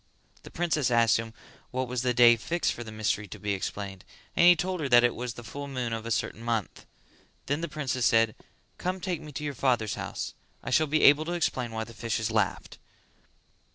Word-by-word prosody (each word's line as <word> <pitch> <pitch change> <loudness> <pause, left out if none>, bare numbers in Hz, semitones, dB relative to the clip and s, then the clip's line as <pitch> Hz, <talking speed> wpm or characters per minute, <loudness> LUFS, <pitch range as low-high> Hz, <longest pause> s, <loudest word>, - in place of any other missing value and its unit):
The - - -12
princess 160 -6 0
asked 115 -4 +4
him 115 0 -5 0.4
what 130 0 -2
was 125 0 -2
the 125 -1 +1
day 120 -1 +7
fixed 170 +9 -1
for 120 - -7
the 110 - -9
mystery 105 -1 -1
to - - -9
be 105 -1 -2
explained; 95 0 -5 0.3
and 175 - +6
he 175 - +9
told 180 +2 -2
her 145 -3 -2
that 120 -1 +7
it 120 - +3
was 125 -1 -5
at - - -25
the 120 - -9
full 140 +4 -7
moon 125 -4 -3
of 115 0 -4
a - - -3
certain 115 0 -2
month. 115 -4 -3 0.6
Then 145 +3 -1
the 170 - -3
princess 140 -5 0
said 115 -1 +3 0.5
"Come 185 +1 -2
take 175 -3 -3
me 155 -1 -9
to 150 - -5
your 145 -1 -2
father's 120 -5 +1
house: - - -5 0.3
I - - -5
shall 155 +4 +3
be 155 +2 +1
able 145 +2 +6
to 175 - -3
explain 130 -8 -1
why 110 0 -3
the 115 - -11
fishes 115 0 -2
laughed." 105 -4 -1
120 Hz, 225 wpm, -28 LUFS, 115-150 Hz, 0.6 s, he